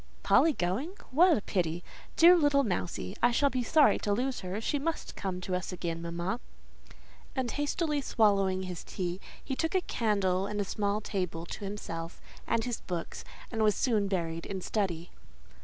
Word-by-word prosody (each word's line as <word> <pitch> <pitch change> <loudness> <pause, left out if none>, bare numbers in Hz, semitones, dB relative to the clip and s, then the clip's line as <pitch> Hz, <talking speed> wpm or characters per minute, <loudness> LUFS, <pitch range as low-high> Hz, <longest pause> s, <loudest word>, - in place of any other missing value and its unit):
"Polly 320 - +5
going? 245 - -2 0.2
What 335 +5 +6
a - - -3
pity! 175 -4 -1 0.3
Dear 345 +2 +8
little 290 -4 +4
Mousie, 185 -2 -2
I 240 - +6
shall 275 +4 +2
be 255 - 0
sorry 295 +5 +4
to 205 - -1
lose 250 +5 0
her: 185 +3 -4
she 285 +6 -1
must 325 +3 -3
come 185 -2 -3
to 185 - -4
us 180 +1 -2
again, 170 -2 -4
mamma." 170 +6 -3 1.0
And 260 -3 -1
hastily 295 0 0
swallowing 195 -6 +2
his 180 -2 -6
tea, 180 0 -4 0.2
he 270 - -3
took 325 +6 -1
a 375 - +4
candle 200 - 0
and 210 0 -3
a - - +2
small 205 +2 -1
table 180 -5 -3
to 200 - -6
himself 170 -4 -5 0.3
and 230 -1 +1
his 245 -2 -3
books, 175 -2 -5 0.3
and 225 -2 -2
was 215 -1 +4
soon 220 -6 +1
buried 165 -4 -2
in 190 -1 -4
study. 180 -5 -2
205 Hz, 175 wpm, -30 LUFS, 180-260 Hz, 1.0 s, Dear